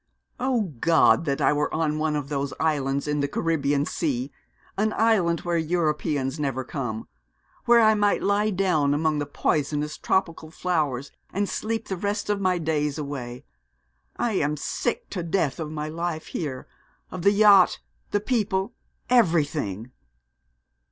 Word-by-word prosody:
'O 250 -2 +1 0.2
God! 165 +2 +4
that 140 -2 -1
I - - +4
were 150 0 0
on 155 -1 0
one 155 -1 0
of 145 -2 -3
those 140 -1 -3
islands 140 -3 0
in 150 0 0
the 140 - +1
Caribbean 145 -2 0
Sea 140 -6 -2 0.4
an 215 +2 0
island 195 -7 +2
where 175 -1 0
Europeans 150 -4 -1
never 135 -3 -1
come 120 -5 -5 0.6
where 240 0 +6
I 220 -1 +6
might 205 -1 +1
lie 205 +1 +2
down 175 -8 +1
among 155 0 +1
the 145 - -3
poisonous 150 +1 -1
tropical 165 -4 -1
flowers, 150 -6 -1 0.2
and 200 +2 -1
sleep 225 +2 -3
the 190 - -3
rest 205 +2 -2
of 200 -1 -1
my 185 -2 +2
days 150 -3 -1
away. 135 -4 -6 0.7
I 240 - 0
am 150 -6 0
sick 240 - -2
to 185 - -3
death 165 -4 -1
of 155 -2 -4
my 150 -1 -4
life 165 0 -3
here; 135 -6 -4 0.5
of 185 - -5
the 200 - +5
yacht, 205 -3 +6 0.3
the 205 - +1
people 210 -2 -1 0.3
everything.' 150 - +1
160 Hz, 150 wpm, -25 LUFS, 145-195 Hz, 0.7 s, where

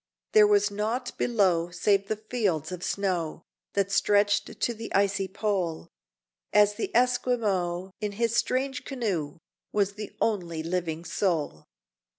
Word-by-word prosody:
There 210 -1 +7
was 205 0 +3
nought 220 +5 -2
below, 185 -8 +2
save 195 +3 +1
the 220 - 0
fields 205 - -1
of 180 0 -6
snow, 175 -5 -1 0.3
That 200 -1 0
stretched 205 +1 +2
to 240 - +1
the 225 0 -8
icy 200 0 +2
pole; 190 -4 -2 0.6
And 210 0 +6
the 205 +2 -4
Esquimaux, 215 -8 +1
in 210 -1 -2
his 230 +2 0
strange 260 +2 0
canoe, 195 - -3 0.3
Was 200 -1 +1
the 210 0 -8
only 175 -7 -1
living 165 -1 -2
soul! 160 - -1
200 Hz, 135 wpm, -27 LUFS, 175-215 Hz, 0.6 s, There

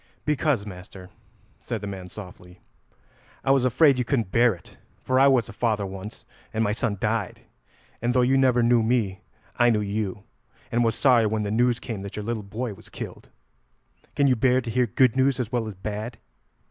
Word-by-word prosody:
"Because, 150 -7 +1
master," 95 -1 -11 0.5
said 115 - -4
the - - -5
man 95 -2 -6
softly, 90 -2 -11 0.8
"I 135 - +2
was 135 -2 +3
afraid 135 +2 +4
you - - +2
couldn't 115 -6 -1
bear 120 -3 +4
it, 85 - -19 0.3
for 130 0 +2
I 135 - +7
was 130 -5 +3
a 115 - -10
father 110 -2 0
once 95 +2 -8 0.3
and 110 - 0
my 105 - +1
son 110 -1 -1
died, 110 -2 -2 0.6
and 120 +1 +1
though 125 - +4
you 130 +2 +3
never 130 -3 +3
knew 120 0 +4
me, 110 -4 0 0.4
I 120 0 +5
knew 110 -2 +2
you, 100 -1 -3 0.5
and 120 +1 +2
was 115 -1 +1
sorry 120 -5 +4
when 105 0 -1
the 100 - -3
news 120 +2 +2
came 110 -5 -6
that 100 0 -7
your 105 - -5
little 115 -1 -2
boy 110 +3 -5
was 95 - -15
killed. - - -8 0.9
Can 140 - +3
you 130 -2 +4
bear 125 +2 +3
to 115 - -5
hear 125 +2 +2
good 125 +3 +3
news 135 0 +2
as 120 -3 -3
well 120 -3 -1
as 105 - -7
bad?" 105 +4 -5
115 Hz, 200 wpm, -25 LUFS, 105-125 Hz, 0.9 s, I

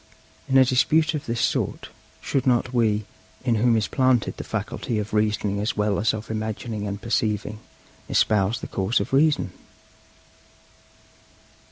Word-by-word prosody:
In 135 - +4
a 130 - +7
dispute 150 +6 +3
of 150 - -4
this 115 0 -2
sort, - - -1 0.3
should 135 -1 -1
not 125 0 +2
we, 110 -3 +1 0.4
in 120 - +2
whom 120 -1 +4
is 105 -3 0
planted 130 -4 +1
the - - -5
faculty 115 - -3
of 105 0 -4
reasoning 105 -1 0
as 105 +2 -2
well 105 -1 +1
as 110 +2 +2
of 110 0 -6
imagining 110 -1 -4
and 100 0 -4
perceiving, 110 -2 -1 0.5
espouse 105 +2 +2
the - - -5
cause 95 +6 0
of - - -4
Reason? 145 -8 +3
110 Hz, 150 wpm, -24 LUFS, 105-125 Hz, 0.5 s, a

